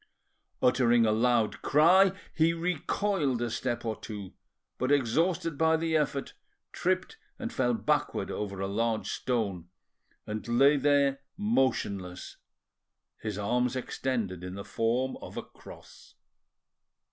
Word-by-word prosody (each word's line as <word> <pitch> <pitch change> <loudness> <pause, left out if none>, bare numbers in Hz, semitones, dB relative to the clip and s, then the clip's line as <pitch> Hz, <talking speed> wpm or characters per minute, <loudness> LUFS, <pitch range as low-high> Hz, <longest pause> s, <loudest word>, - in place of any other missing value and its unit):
Uttering 120 -2 +4
a 110 - +3
loud 115 0 +2
cry, 180 +6 +5 0.2
he 165 +1 +3
recoiled 170 - -1
a 120 -1 -2
step 120 0 -2
or 110 -1 -1
two, 105 -3 -8 0.5
but, 130 +2 0
exhausted 160 +5 +1
by 160 0 +4
the 160 0 -1
effort, 140 -2 -1 0.4
tripped 445 - -1 0.2
and 240 -1 -5
fell 125 -2 +1
backward 110 -1 0
over 100 -2 -4
a 95 - -1
large 110 +2 -1
stone, 100 -9 -2 0.6
and 105 +1 -5
lay 135 +5 +5
there 140 -1 +3 0.2
motionless, 100 - -1 0.8
his 105 -3 -4
arms 120 +4 0
extended 115 -8 -3
in 90 +1 -6
the 100 - -7
form 120 +4 0
of - - -9
a - - -3
cross. - - -15
125 Hz, 125 wpm, -29 LUFS, 110-150 Hz, 0.8 s, cry